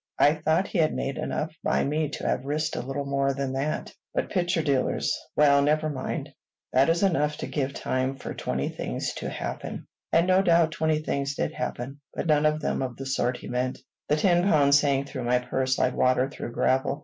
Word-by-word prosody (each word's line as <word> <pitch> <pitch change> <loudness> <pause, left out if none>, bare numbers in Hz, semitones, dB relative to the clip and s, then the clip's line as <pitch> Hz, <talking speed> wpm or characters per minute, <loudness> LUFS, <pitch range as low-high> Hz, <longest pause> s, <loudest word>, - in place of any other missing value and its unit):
"I 145 - +5
thought 160 +4 +1
he 190 - -1
had 155 -1 +2
made 135 0 -3
enough 155 +1 -2
by - - +2
me 150 +1 0
to - - -6
have - - 0
risked 150 +3 -1
a - - -2
little 135 +3 -4
more 140 0 0
than 135 -1 -2
that; 140 +3 -2 0.2
but - - -1
picture 175 -3 +1
dealers 140 -4 +1 0.2
Well, 140 -1 +5
never 155 +2 +2
mind. 130 -2 -4 0.4
That 135 +4 +4
is 170 +3 +2
enough 150 -6 +2
to - - -4
give 140 -2 -2
time 130 +1 -1
for 135 - -6
twenty 65 +2 -2
things - - -3
to - - -4
happen." - - -5 0.3
And 165 +1 +4
no 185 +1 +4
doubt 170 -3 +4
twenty 160 -1 0
things 140 -1 -2
did - - -2
happen, 135 +4 -5
but - - -2
none 155 -1 +4
of 155 0 0
them - - -1
of 130 -2 -4
the 135 - -6
sort 125 -2 0
he - - -10
meant. 125 +1 -1 0.3
The 150 - +3
ten 175 +2 +3
pounds 145 -6 +5
sank 140 -1 +1
through 130 -3 -5
my 125 +1 +3
purse 130 +1 -1
like 125 - +2
water 130 +1 +3
through 120 -4 -7
gravel. 130 +4 +1
140 Hz, 210 wpm, -26 LUFS, 135-155 Hz, 0.4 s, I